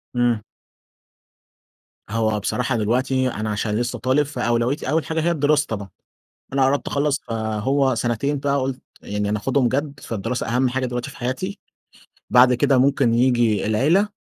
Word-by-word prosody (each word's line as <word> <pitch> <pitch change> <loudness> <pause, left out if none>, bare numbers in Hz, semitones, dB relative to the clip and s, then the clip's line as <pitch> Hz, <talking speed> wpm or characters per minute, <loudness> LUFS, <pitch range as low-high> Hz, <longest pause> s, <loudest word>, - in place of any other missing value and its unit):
امم. 120 -2 +2 1.7
هو 110 -1 0
بصراحة 125 +5 -1
دلوقتي 130 +4 +1
أنا 110 -2 -4
علشان 105 0 -1
لسه 120 +2 -2
طالب 130 +4 +2
فأولويتي 125 0 -1
أول 155 0 +1
حاجة 160 0 -1
هي 170 +2 +1
الدراسة 150 -1 +2
طبعًا. 100 -3 -4 0.6
أنا 135 -1 +3
قربت 140 +2 0
أخلص، 145 0 0
فهو 115 +5 0
سنتين 120 +5 -1
بقى 140 0 0
قلت 130 0 -3 0.2
يعني 105 0 -3
أنا 105 - 0
أخدهم 130 +3 +1
جد، 140 +2 -2
فالدراسة 115 +1 -3
أهم 125 +2 +1
حاجة 130 +1 -1
دلوقتي 125 -1 -4
في - - -13
حياتي. 130 - -3 0.7
بعد 125 0 +6
كده 130 +2 +3
ممكن 135 -2 +3
ييجي 120 -4 +2
العيلة، 155 - +2
125 Hz, 150 wpm, -22 LUFS, 115-140 Hz, 1.7 s, بعد